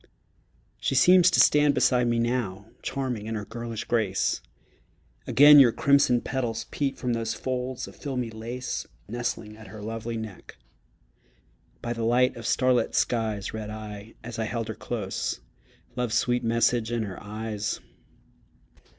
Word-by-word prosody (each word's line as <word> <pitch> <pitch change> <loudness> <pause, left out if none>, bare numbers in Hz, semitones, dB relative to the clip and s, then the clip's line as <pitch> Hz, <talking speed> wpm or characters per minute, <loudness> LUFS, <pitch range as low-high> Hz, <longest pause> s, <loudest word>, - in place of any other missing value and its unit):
She - - -1
seems 180 +6 +7
to 180 - +2
stand 145 -1 +5
beside 125 -2 +3
me 120 0 +1
now, 115 -5 -1 0.2
Charming 125 -6 -3
in 110 - -3
her 105 -1 -4
girlish 115 -1 -5
grace; 110 -5 0 0.9
Again 145 +1 +8
your 125 -4 +7
crimson 140 -3 +3
petals 120 -4 -2
peep 140 -2 -1
From 125 -2 -1
those 115 -1 -2
folds 130 0 -3
of - - -12
filmy 125 -5 -4
lace 115 +3 -5 0.2
Nestling 115 -1 -4
at 110 0 -13
her 110 - -10
lovely 115 +2 -4
neck. 110 -4 -9 1.3
By 120 - -2
the 115 -1 -4
light 125 +3 +3
of 115 - -6
starlit 125 -3 +2
skies 110 -4 0
Read 110 -1 -5
I, 105 0 -8
as 115 0 -7
I 110 - 0
held 115 0 -3
her - - -2
close, 105 -6 -3 0.6
Love's 125 -3 -1
sweet 125 0 +1
message 115 0 +1
in 120 -1 0
her 100 -3 -7
eyes. 105 0 -4
115 Hz, 150 wpm, -26 LUFS, 110-125 Hz, 1.3 s, Again